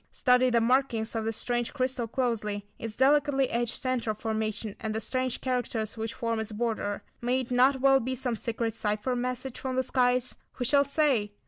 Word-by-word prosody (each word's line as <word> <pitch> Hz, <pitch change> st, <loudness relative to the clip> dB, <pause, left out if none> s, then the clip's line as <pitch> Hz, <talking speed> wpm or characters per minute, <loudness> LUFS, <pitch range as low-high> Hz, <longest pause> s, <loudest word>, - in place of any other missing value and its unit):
Study 250 Hz, 0 st, +3 dB
the 235 Hz, -1 st, +3 dB
markings 240 Hz, -2 st, +1 dB
of 225 Hz, -1 st, -2 dB
this 225 Hz, -1 st, -2 dB
strange 240 Hz, +2 st, -2 dB
crystal 255 Hz, -3 st, 0 dB
closely; 220 Hz, -4 st, -1 dB
its 225 Hz, -1 st, -5 dB
delicately 275 Hz, 0 st, +3 dB
etched 235 Hz, 0 st, -1 dB
centre 250 Hz, -4 st, -1 dB
formation, 220 Hz, -1 st, -3 dB
and 220 Hz, -1 st, -3 dB
the -, -, 0 dB
strange 255 Hz, +2 st, -2 dB
characters 245 Hz, -4 st, -2 dB
which 225 Hz, 0 st, -4 dB
form 230 Hz, -1 st, -1 dB
its 220 Hz, 0 st, -4 dB
border. 215 Hz, -2 st, -2 dB, 0.2 s
May 250 Hz, +2 st, +1 dB
it 255 Hz, -, -8 dB
not 255 Hz, +2 st, +4 dB
well 270 Hz, 0 st, +6 dB
be 260 Hz, +1 st, -2 dB
some 245 Hz, -1 st, -1 dB
secret 225 Hz, 0 st, -2 dB
cypher 215 Hz, +3 st, -1 dB
message 250 Hz, +1 st, -3 dB
from 260 Hz, -1 st, -3 dB
the 260 Hz, -, +2 dB
skies? 250 Hz, -1 st, +2 dB, 0.2 s
Who 245 Hz, -, -3 dB
shall 280 Hz, +2 st, +4 dB
say? 275 Hz, -8 st, +1 dB
240 Hz, 190 wpm, -28 LUFS, 225-260 Hz, 0.2 s, well